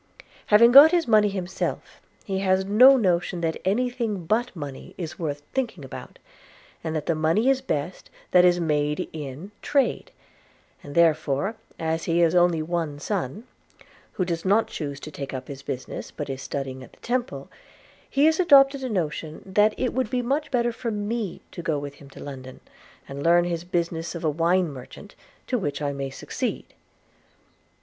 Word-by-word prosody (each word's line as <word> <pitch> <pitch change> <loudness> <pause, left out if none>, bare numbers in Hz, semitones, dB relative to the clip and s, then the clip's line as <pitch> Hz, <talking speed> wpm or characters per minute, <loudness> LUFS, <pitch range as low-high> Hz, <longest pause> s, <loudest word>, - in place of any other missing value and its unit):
Having 235 +3 +7
got 280 +5 +10
his 340 -4 +1
money 215 -2 +5
himself, 190 -2 -4 0.2
he 195 -3 -2
has 190 0 +2
no 250 +7 +7
notion 180 -4 0
that 160 -1 -2
any 225 +7 +1
thing 225 -8 -3
but 230 +5 0
money 145 -5 -8
is 165 -4 -6
worth 145 -3 -3
thinking 230 - -3
about; 130 - -10 0.7
and 160 -1 -3
that 150 -1 -2
the 170 - +1
money 160 +10 +2
is 270 -1 +2
best 165 - -4 0.2
that 180 - +6
is 175 0 +4
made 150 -2 0
in 150 +5 -7
trade; 285 - 0 0.7
and 145 - -10
therefore, 160 +2 +2 0.2
as 160 0 -2
he 165 0 +1
has 170 -1 +4
only 175 -3 +3
one 165 -3 -2
son, 140 - -3 0.7
who 185 - -1
does 170 -2 -3
not 205 +4 +3
choose 140 -3 -5
to 155 - -9
take 140 -2 -6
up 130 0 -6
his 135 -1 -8
business, 130 -1 -6
but 145 -3 -6
is 135 0 -6
studying 135 -1 -5
at - - -15
the - - -22
Temple, 245 +1 -2 0.6
he 280 +2 +3
has 320 +2 +3
adopted 275 -5 +6
a 260 - -2
notion, 160 -5 -3
that 210 +3 +3
it 255 - -1
would 255 -3 -1
be 250 +1 -1
much 280 +5 -1
better 240 -2 +1
for 230 +1 -4
me 210 -1 -3
to - - -7
go 160 -3 -1
with 145 0 -6
him 140 - -13
to - - -14
London, 130 -2 -9 0.5
and 140 +1 -7
learn 170 +2 +4
his 170 -1 -3
business 170 -1 -2
of 170 - -6
a 155 - +2
wine 170 +2 +1
merchant, 130 -2 -11 0.3
to 250 - -1
which 145 -8 -3
I 145 -1 -2
may 140 -1 -4
succeed.' - - -5
175 Hz, 180 wpm, -25 LUFS, 150-225 Hz, 0.7 s, got